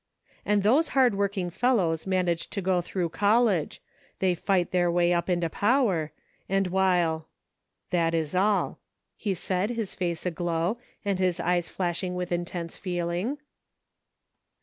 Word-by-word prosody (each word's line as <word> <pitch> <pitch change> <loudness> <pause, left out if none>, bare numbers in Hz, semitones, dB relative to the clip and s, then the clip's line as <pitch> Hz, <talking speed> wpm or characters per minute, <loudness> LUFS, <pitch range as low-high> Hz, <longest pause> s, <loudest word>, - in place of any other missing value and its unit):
And 205 -1 +2
those 275 +10 +4
hard 255 -4 +5
working 195 -2 -1
fellows 190 -8 +1
manage 180 -3 0
to 205 - -3
go 185 -1 +2
through 175 0 -2
college. 205 -1 +2 0.3
They 185 -1 +2
fight 180 0 0
their 175 -1 +2
way 175 0 +3
up 170 +1 0
into 175 -2 +1
power: 200 - +1 0.4
and 195 0 +2
while 175 -4 +1 0.2
— - - -55
" - - -55
" - - -54
That 165 -2 +2
is 160 -1 -1
all," 200 +3 +1 0.4
he 200 -4 -2
said, 185 +3 -1
his 230 -5 -3
face 175 -2 -3
aglow, 175 +4 -1 0.3
and 200 -2 0
his 185 -2 +1
eyes 175 -1 0
flashing 180 0 -2
with 180 0 -3
intense 175 -1 -3
feeling. 180 +7 -2
180 Hz, 150 wpm, -27 LUFS, 170-200 Hz, 0.4 s, hard